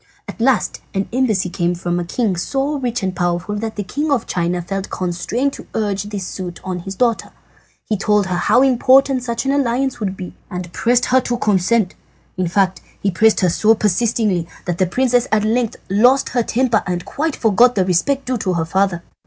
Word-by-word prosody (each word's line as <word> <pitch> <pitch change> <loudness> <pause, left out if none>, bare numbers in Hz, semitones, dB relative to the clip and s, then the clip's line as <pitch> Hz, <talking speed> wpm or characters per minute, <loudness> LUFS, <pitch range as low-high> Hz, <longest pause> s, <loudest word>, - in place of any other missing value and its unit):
"At - - -8
last 250 -1 +1
an 195 0 -1
embassy 225 -8 +1
came 175 -2 0
from 175 0 -2
a - - -2
king 195 +3 -1
so 275 - -1
rich 245 -3 -2
and 185 -1 -2
powerful 175 +2 -1
that 220 +1 -4
the 205 - -3
King 295 +10 -3
of 255 -5 +1
China 175 0 -1
felt 195 +2 -4
constrained 185 +10 -2
to - - -10
urge 205 -2 -1
this 205 -3 -5
suit 180 -1 -6
on 185 -1 -4
his 195 +3 -7
daughter. 235 +1 0 0.6
He 215 - -1
told 210 0 +2
her 180 -1 -2
how 250 +8 +3
important 265 +1 +4
such 235 +1 -3
an 270 - +1
alliance 270 -1 0
would 195 -3 -3
be, 180 - -7 0.2
and 180 -2 -6
pressed 245 +1 +2
her 260 +1 +3
to 240 -1 -2
consent. 210 -1 +1 0.4
In 185 -1 -1
fact, 185 +1 +1 0.2
he 200 - 0
pressed 220 +5 +3
her 180 - +3
so 220 +5 +3
persistingly 210 -3 +1 0.2
that 175 0 -3
the 185 - +3
princess 245 +4 +1
at 215 -1 +2
length 225 +1 0
lost 245 +8 +3
her 245 - +1
temper 235 -1 +1
and 175 -1 -2
quite 315 0 -2
forgot 235 +3 +4
the 190 -3 +2
respect 225 +10 +1
due 250 -2 -1
to 185 -3 -1
her 165 -2 0
father. 180 0 0
210 Hz, 200 wpm, -19 LUFS, 185-245 Hz, 0.6 s, important